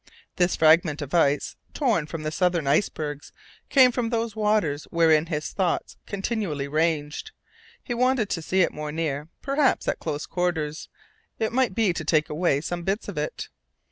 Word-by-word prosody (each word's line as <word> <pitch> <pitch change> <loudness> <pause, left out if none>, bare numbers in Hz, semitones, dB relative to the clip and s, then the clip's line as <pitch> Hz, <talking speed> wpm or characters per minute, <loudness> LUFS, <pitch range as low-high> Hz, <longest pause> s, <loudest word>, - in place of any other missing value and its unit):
This 175 0 +2
fragment 155 -1 +4
of 145 - -9
ice, 145 -4 +2 0.2
torn 225 - +1
from 160 -1 -6
the 155 - -2
southern 175 -2 +1
icebergs, 145 -1 -1 0.4
came 260 -3 +6
from 240 -1 -1
those 230 -2 -2
waters 210 -9 +1
wherein 160 -2 +3
his 150 -3 -3
thoughts 185 -4 -1
continually 195 -8 -2
ranged. 155 - -1 0.5
He 245 - -3
wanted 250 -2 +2
to 165 - -2
see 185 +4 +1
it - - +2
more 150 0 -5
near, 150 -2 -2 0.2
perhaps 275 0 +1
at - - 0
close 150 -2 -3
quarters, 160 -4 -2 0.5
it 220 0 -1
might 255 -6 +1
be 215 -6 +2
to 160 - -4
take 155 0 +2
away 150 -3 +1
some 175 +2 -4
bits 195 +5 -2
of - - -7
it. - - -4
170 Hz, 170 wpm, -25 LUFS, 150-215 Hz, 0.5 s, came